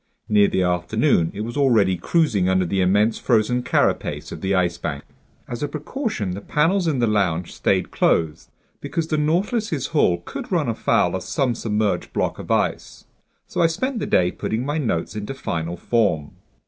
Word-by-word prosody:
Near 105 -1 +4
the 95 - 0
afternoon 90 -2 +1
it 105 - -6
was 115 +2 -5
already 115 -10 +3
cruising 105 - +1
under 95 -1 +2
the 95 +2 0
immense 105 +4 +2
frozen 125 +1 +2
carapace - - 0
of - - -7
the 95 +1 0
Ice 85 -2 +1
Bank. 70 - -4 0.4
As 120 - -6
a 145 - 0
precaution, 150 - -3
the 95 +3 -5
panels 170 - +1
in 150 -4 +1
the 120 - +2
lounge 95 -6 0
stayed - - 0
closed, 80 -2 0 0.3
because 165 -1 -3
the 155 - +1
Nautilus's 170 - 0
hull 90 - +3
could - - -7
run - - +1
afoul 90 +1 +1
of 95 - -3
some 135 -5 0
submerged 105 -2 -1
block - - -1
of - - -9
ice. - - -1 0.4
So - - -2
I 165 - +6
spent 245 +10 -2
the - - -3
day 90 0 +3
putting 115 +4 -3
my 145 +3 -1
notes 110 - -2
into 105 +5 -5
final 85 -8 -3
form. 95 -10 0
110 Hz, 180 wpm, -22 LUFS, 90-150 Hz, 0.4 s, I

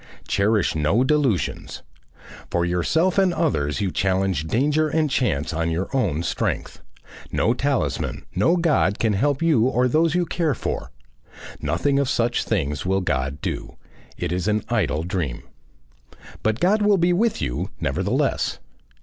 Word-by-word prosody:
Cherish 105 -1 +2
no 80 +10 +2
delusions; 130 - 0 0.7
for 85 0 0
yourself 160 - +1
and 190 -2 +3
others 90 - 0
you 95 -3 0
challenge 95 -4 0
danger 150 - +2
and 155 -1 0
chance 85 - 0
on 80 +1 -1
your 85 +10 -2
own 85 - 0
strength; 85 - -2 0.5
no 115 - +2
talisman, 125 - -1
no 170 +2 +3
God, 150 - +2
can 110 -2 +1
help 140 +8 +1
you 150 -9 +3
or 125 -1 +2
those 160 +5 +2
you 180 -1 +2
care 165 -5 0
for. 65 - -4 0.7
Nothing 85 - +1
of 140 -2 0
such 120 -2 +1
things 75 -10 -1
will 95 +1 +1
God 70 -3 -2
do; - - -5 0.4
it 85 -1 -3
is 90 +1 -1
an 105 0 +1
idle 85 -10 0
dream. 85 -9 -3 1.0
But 110 +2 0
God 200 +7 +3
will 205 -1 +4
be 175 0 +3
with 220 +5 +1
you - - -2
nevertheless. - - 0
110 Hz, 150 wpm, -23 LUFS, -, 1.0 s, will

